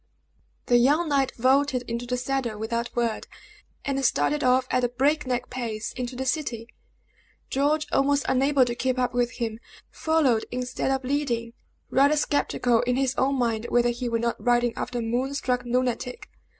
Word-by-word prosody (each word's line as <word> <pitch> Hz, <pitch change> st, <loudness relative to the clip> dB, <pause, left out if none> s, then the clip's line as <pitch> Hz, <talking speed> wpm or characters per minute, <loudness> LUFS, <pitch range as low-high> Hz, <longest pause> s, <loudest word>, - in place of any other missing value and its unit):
The 245 Hz, -, +4 dB
young 295 Hz, +7 st, +3 dB
knight 275 Hz, -2 st, +2 dB
vaulted 260 Hz, +1 st, +2 dB
into 235 Hz, 0 st, -5 dB
the 250 Hz, +1 st, -1 dB
saddle 250 Hz, -3 st, -2 dB
without 230 Hz, +2 st, -2 dB
a -, -, -33 dB
word, 235 Hz, -2 st, -1 dB, 0.6 s
and 275 Hz, -1 st, -1 dB
started 295 Hz, +3 st, +1 dB
off 255 Hz, 0 st, +3 dB
at 255 Hz, 0 st, +1 dB
a 245 Hz, -, +2 dB
break 275 Hz, +4 st, +1 dB
neck 250 Hz, -1 st, -2 dB
pace 230 Hz, -4 st, -4 dB
into 250 Hz, 0 st, -5 dB
the 265 Hz, +1 st, -3 dB
city. 255 Hz, -5 st, -2 dB, 0.8 s
George, 295 Hz, +3 st, +1 dB
almost 280 Hz, 0 st, +2 dB
unable 270 Hz, 0 st, +3 dB
to 240 Hz, -, -2 dB
keep 255 Hz, +1 st, -1 dB
up 250 Hz, -1 st, 0 dB
with 245 Hz, 0 st, 0 dB
him, 225 Hz, -2 st, -4 dB, 0.3 s
followed 295 Hz, -8 st, +1 dB
instead 250 Hz, +1 st, -3 dB
of 270 Hz, 0 st, 0 dB
leading, 250 Hz, -4 st, -1 dB, 0.4 s
rather 285 Hz, +3 st, +4 dB
skeptical 250 Hz, -5 st, +1 dB
in 245 Hz, 0 st, 0 dB
his 265 Hz, -1 st, +1 dB
own 275 Hz, +1 st, +1 dB
mind 235 Hz, -3 st, -1 dB
whether 240 Hz, 0 st, +3 dB
he 240 Hz, +1 st, -3 dB
were 230 Hz, -, +1 dB
not 235 Hz, +1 st, -2 dB
riding 240 Hz, -1 st, +2 dB
after 245 Hz, -, -4 dB
a -, -, -1 dB
moon 250 Hz, +5 st, -1 dB
struck 250 Hz, -3 st, 0 dB
lunatic. 250 Hz, 0 st, -2 dB
250 Hz, 175 wpm, -25 LUFS, 240-270 Hz, 0.8 s, The